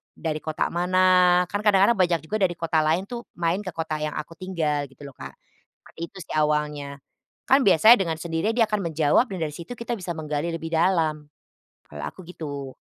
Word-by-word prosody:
dari 155 -2 -3
kota 155 -1 -2
mana?" 180 0 +4
Kan 205 - -1
kadang-kadang 210 +2 +4
banyak 175 -2 +3
juga 215 +7 -2
dari 180 -2 +2
kota 165 -1 0
lain 160 +4 +1
tuh, 240 +3 -6 0.2
main 170 +2 0
ke 200 - -6
kota 160 -2 -3
yang 150 -1 -3
aku 150 +2 -6
tinggal 160 -5 -2
gitu 135 +2 -14
loh, 140 - -10
Kak. - - -10 0.5
Seperti - - -17
itu - - -16
sih - - -8
awalnya. 150 -2 -1 0.5
Kan 270 +1 +5
biasanya 200 +4 +7
dengan 165 -4 -2
sendirinya 165 +5 -1
dia 230 - +5
akan 210 -1 0
menjawab 155 - +3
dan 190 - -4
dari 150 -1 -3
situ 170 +8 -9
kita 235 +1 -4
bisa 185 -5 -5
menggali 150 +1 -2
lebih 165 0 -5
dalam. 160 -3 +1 0.6
Kalau 75 0 -7
aku - - -13
gitu. 140 -6 -7
165 Hz, 195 wpm, -24 LUFS, 150-185 Hz, 0.6 s, biasanya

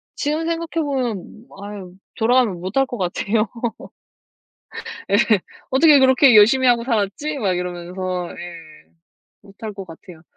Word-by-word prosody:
지금 305 +3 -2
생각해 335 -1 -2
보면 240 -5 -4 0.2
아유 200 -3 -8 0.2
돌아가면 225 -5 +2
못 185 +7 -5
할 270 - +4
것 245 -2 -7
같아요. 205 +4 -1 1.6
예 200 - +4 0.5
'어떻게 290 +2 +6
그렇게 260 -1 +5
열심히 245 +5 +6
하고 240 -1 +4
살았지?' 240 +6 -1
막 200 -7 0
이러면서 180 0 -4
예. 165 - -11 0.5
못 195 0 -18
할 215 -2 -5
것 195 -1 -7
같아요. 165 0 -13
215 Hz, 265 characters per minute, -20 LUFS, 180-265 Hz, 1.6 s, 어떻게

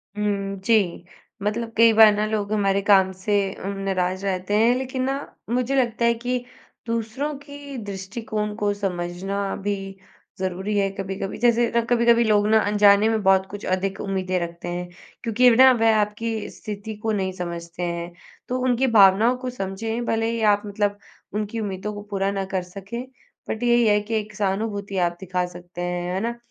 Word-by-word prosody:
हुँ, 200 -1 -1
जी। 195 -5 +1 0.4
मतलब 225 +2 -2
कई 230 0 +7
बार 220 -1 +8
ना 210 +1 0
लोग 215 -1 -2
हमारे 200 -2 +2
काम 195 -2 +4
से 190 +3 -3 0.3
उम, 200 0 -3
नाराज़ 190 0 -1
रहते 185 0 -2
हैं, 230 +3 +5
लेकिन 260 0 -3
ना 270 +2 -3
मुझे 250 +2 0
लगता 235 -3 +1
है 235 - +4
कि 245 +1 -3 0.4
दूसरों 230 +6 -2
की 285 -1 -9
दृष्टिकोण 210 +1 -4
को 205 -1 0
समझना 195 +1 -3
भी 205 0 0 0.6
ज़रूरी 190 +3 -2
है 195 -1 +2
कभी-कभी। 195 0 -4
जैसे 235 0 +3
र 235 - +4
कभी-कभी 235 -1 +4
लोग 210 -1 +3
ना 220 0 +5
अनजाने 205 +1 +5
में 220 -1 0
बहुत 190 0 +4
कुछ 205 0 -7
अधिक 190 +1 -1
उम्मीदें 185 -2 -1
रखते 170 0 -6
हैं, 175 0 -4 0.3
क्योंकि 245 +2 +4
ना 260 +2 +8
वह 225 -1 +4
आपकी 210 +1 -2
स्थिति 210 +1 -7
को 220 0 -2
नहीं 190 -2 -1
समझते 170 -1 -6
हैं। 170 0 -3 0.4
तो 255 +1 -1
उनकी 255 +1 +2
भावनाओं 220 +3 +5
को 255 0 -4
समझें, 225 +2 -4
भले 225 0 0
ही 230 -1 -2
आप 205 -1 +4
मतलब 205 0 -1 0.4
उनकी 215 +2 -3
उम्मीदों 205 0 -4
को 205 - -7
पूरा 195 0 0
न 195 -1 -2
कर 190 -2 0
सकें, 195 +7 -7 0.4
बट 220 - -3
यही 240 -1 +4
है 210 0 +4
कि 215 +2 -6
एक 210 -1 -9
सहानुभूति 200 0 -2
आप 175 -1 +1
दिखा 180 -1 -1
सकते 175 0 -9
हैं, 175 0 -2
है 190 - -1
ना? 235 +1 -2
205 Hz, 180 wpm, -23 LUFS, 190-230 Hz, 0.6 s, बार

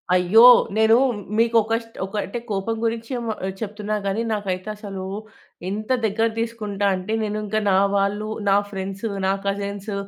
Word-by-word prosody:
అయ్యో! 185 +6 +6 0.3
నేను 220 +1 +5 0.4
మీకు 230 +1 +2
ఒక 220 +1 -3
స్టో 230 0 -19
ఒక 195 +2 -9
అంటే 235 +5 -5
కోపం 200 +3 -1
గురించి 230 +2 -3
మ 225 - -1 0.3
చెప్తున్నా 210 -1 -3
గానీ, 200 +3 0
నాకైతసలు 200 -1 -4 0.7
ఎంత 215 +4 -5 0.2
దగ్గర 220 +2 +1
తీసుకుంటా 215 -3 -3
అంటే 185 +4 -4
నేనుంకా 215 0 -2
నా 190 - +4 0.2
వాళ్ళు, 205 +2 0 0.2
నా 195 - +5
ఫ్రెండ్స్, 195 +1 -5 0.2
నా 190 - +3
కజిన్స్, 200 +1 -3
210 Hz, 145 wpm, -22 LUFS, 195-220 Hz, 0.7 s, అయ్యో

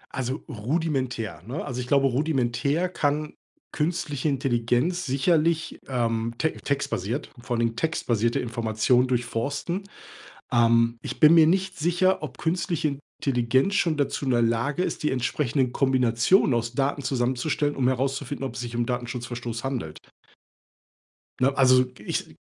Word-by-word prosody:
Also, 130 +3 -3
rudimentär, 130 - -2
ne? 140 +6 -4
Also, 125 -3 -4
ich 125 - -6
glaube 140 0 +3
rudimentär 140 +3 0
kann 150 -3 -1 0.4
künstliche 150 -2 -1
Intelligenz 135 +6 0
sicherlich, 160 +4 +1
ähm, 115 -2 -1
te 160 - +1
textbasiert 135 -3 -3
vor 120 0 -3
allen 115 - 0
Dingen 115 0 -2
textbasierte 120 -6 0
Informationen 115 +2 +1
durchforsten, 140 - -2 0.7
ähm, 115 0 +3
ich - - -6
bin 155 +2 +7
mir 160 -1 +7
nicht 185 +2 +1
sicher, 175 +2 +1
ob 140 - -7
künstliche 165 -4 -1 0.2
Intelligenz 130 +8 +2
schon 165 -5 +2
dazu 140 0 -1
in 130 - +1
der 120 -1 +3
Lage 120 +8 0
ist, - - -3
die 150 - +1
entsprechenden 130 0 0
Kombinationen 130 - +3
aus 115 +1 -2
Daten 140 +1 -1
zusammenzustellen, 130 +4 0
um 125 -2 +1
herauszufinden, 135 +2 -1
ob 125 -3 -4
es - - -4
sich 120 -1 -6
um 120 -1 0
Datenschutzverstoß 120 -1 -4
Verstoß - - -9
handelt. 120 - -4 1.4
Ne? 135 +2 +2
Also, 130 -1 +5
ich - - -4
130 Hz, 140 wpm, -25 LUFS, 120-150 Hz, 1.4 s, bin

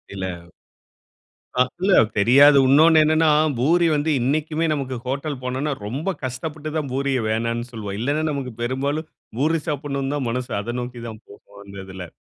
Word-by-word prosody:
இல்ல. 95 -1 -3 1.3
ஆ - - +6 0.2
இல்ல 195 - +2 0.3
தெரியாது, 140 +7 +6
இன்னொன்னு 155 +3 +6
என்னனா 155 +1 +3 0.3
பூரி 170 +7 +3
வந்து 145 +2 0
இன்னைக்குமே 155 +5 0
நமக்கு 135 -3 -3
ஹோட்டல் 140 +1 -3
போனோனா, 130 +4 -2
ரொம்ப 140 - -3
கஷ்டப்பட்டு 150 +4 -5
தான் 145 -4 -3
பூரிய 135 -2 0
வேண்டானு 115 +2 -2
சொல்வோம். 105 -3 -6
இல்லனா 145 +6 0
நமக்கு 130 -4 -4
பெரும்பாலும் 140 +6 -2 0.3
பூரி 160 +3 +1
சாப்பிடனு 140 -1 -2
தான் 140 -4 -2
மனசு 125 +1 -3
அதை 120 +4 -5
நோக்கி 120 -1 -7
தான் 110 -1 -9
போகும் 100 0 -16
அந்த 100 0 -12
இதில. 95 -2 -8
135 Hz, 150 wpm, -22 LUFS, 120-150 Hz, 1.3 s, ஆ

